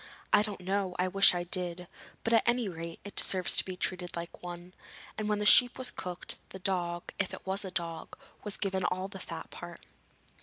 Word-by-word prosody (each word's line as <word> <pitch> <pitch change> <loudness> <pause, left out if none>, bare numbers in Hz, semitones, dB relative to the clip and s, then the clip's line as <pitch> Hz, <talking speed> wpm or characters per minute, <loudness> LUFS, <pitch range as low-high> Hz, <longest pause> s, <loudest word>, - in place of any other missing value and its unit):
'I - - +7
don't 210 -3 -4
know; 190 0 -1
I 180 - +1
wish 195 0 +6
I 175 - -1
did. 180 0 -3 0.4
But 230 - 0
at 225 - +5
any 240 -2 +2
rate, 165 -2 -6
it 205 - -9
deserves 185 -2 +6
to - - +4
be 185 -1 -7
treated 180 -1 -3
like 170 0 -7
one,' 175 0 -8 0.4
and 215 -1 -3
when 210 - +1
the 210 - -2
sheep 245 +3 +7
was 255 -1 -1
cooked, 180 -1 -3
the - - -8
dog 175 -2 -2
if 195 - -1
it - - -15
was 195 +2 +1
a 190 - -5
dog 170 -3 -5 0.3
was 210 -2 0
given 190 -2 -1
all 185 +2 -1
the - - -9
fat - - -8
part. - - -10
185 Hz, 215 wpm, -30 LUFS, 175-200 Hz, 0.4 s, I